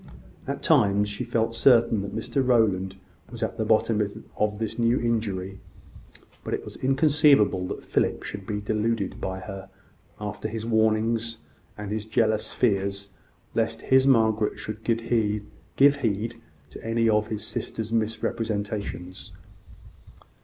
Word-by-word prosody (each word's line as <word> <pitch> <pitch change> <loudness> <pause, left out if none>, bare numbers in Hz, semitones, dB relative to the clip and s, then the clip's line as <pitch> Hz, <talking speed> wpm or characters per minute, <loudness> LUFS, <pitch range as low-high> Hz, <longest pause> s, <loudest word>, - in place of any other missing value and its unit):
At 140 +1 -4
times 105 -9 +3
she 105 +5 -4
felt 115 -1 -1
certain 115 -3 +4
that 100 - -6
Mrs 130 +4 -1
Rowland 100 -6 +2 0.3
was 115 0 -5
at 115 +1 -3
the 110 - +1
bottom 110 0 +2 0.3
of 105 -1 0
this 110 +1 -4
new 115 +2 +3
injury: 100 -5 -2 0.8
but - - -1
it - - -8
was - - -9
inconceivable 135 - +3
that - - -6
Philip - - 0
should 100 -2 -7
be 105 -1 -2
deluded 105 -1 -1
by 95 0 -3
her, 95 0 -8 0.5
after 105 0 -4
his 110 0 -5
warnings, 115 +1 +1 0.4
and 105 -1 -6
his 110 0 -2
jealous 110 -1 +1
fears 100 -3 0 0.4
lest - - -1
his 130 0 +6
Margaret 110 -4 +3
should 110 +1 -7
give 115 -1 0
heed 110 -3 0 0.3
to 115 - 0
any 115 0 +1
of 105 -1 +2
his 110 -1 -4
sister's 110 +1 -4
misrepresentations. 105 -4 -3
110 Hz, 135 wpm, -26 LUFS, 105-115 Hz, 0.8 s, his